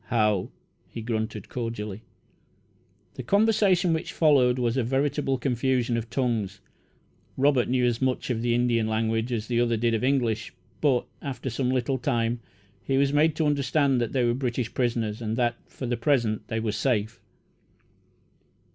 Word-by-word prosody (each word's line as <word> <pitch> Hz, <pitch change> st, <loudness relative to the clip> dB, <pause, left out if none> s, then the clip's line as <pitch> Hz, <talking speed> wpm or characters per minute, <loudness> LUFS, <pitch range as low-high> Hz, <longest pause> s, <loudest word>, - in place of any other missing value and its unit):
"How!" 105 Hz, -4 st, +1 dB, 0.4 s
he -, -, -7 dB
grunted 110 Hz, -2 st, -3 dB
cordially. 110 Hz, -4 st, -5 dB, 1.1 s
The -, -, -6 dB
conversation 200 Hz, -, +3 dB
which 160 Hz, -, -3 dB
followed 135 Hz, -6 st, +4 dB
was 120 Hz, -1 st, 0 dB
a 130 Hz, -, +2 dB
veritable 135 Hz, +2 st, 0 dB
"confusion 125 Hz, -1 st, 0 dB
of 115 Hz, 0 st, -3 dB
tongues." 110 Hz, -7 st, -1 dB, 0.8 s
Robert 135 Hz, -2 st, +3 dB
knew 125 Hz, 0 st, +2 dB
about -, -, +4 dB
as 120 Hz, +1 st, -3 dB
much 130 Hz, 0 st, 0 dB
of 115 Hz, -2 st, -1 dB
the 120 Hz, 0 st, +1 dB
Indian 120 Hz, -2 st, +1 dB
language 110 Hz, +2 st, 0 dB
as 110 Hz, -3 st, -2 dB
the 120 Hz, 0 st, +1 dB
other 120 Hz, -1 st, +1 dB
did 115 Hz, +1 st, +1 dB
of 115 Hz, -, 0 dB
English; 125 Hz, -5 st, 0 dB, 0.3 s
but, 135 Hz, -5 st, +2 dB, 0.2 s
after 135 Hz, -2 st, -4 dB
some 125 Hz, +2 st, -1 dB
little 130 Hz, +1 st, 0 dB
time, 120 Hz, -2 st, 0 dB, 0.4 s
he 135 Hz, -, 0 dB
was 140 Hz, 0 st, +2 dB
made 155 Hz, +1 st, +3 dB
to 160 Hz, -, 0 dB
understand 140 Hz, -2 st, +2 dB
that 120 Hz, -, -1 dB
they 130 Hz, -3 st, +1 dB
were 120 Hz, -, +2 dB
British 125 Hz, -2 st, -2 dB
prisoners, 115 Hz, -3 st, -1 dB
and 110 Hz, 0 st, -2 dB
that, 120 Hz, -1 st, +2 dB
for 130 Hz, -, -7 dB
the 120 Hz, 0 st, -1 dB
present, 115 Hz, -4 st, +1 dB
they 115 Hz, -, -2 dB
were 110 Hz, -1 st, -1 dB
safe. 110 Hz, 0 st, -1 dB
120 Hz, 165 wpm, -26 LUFS, 115-135 Hz, 1.1 s, followed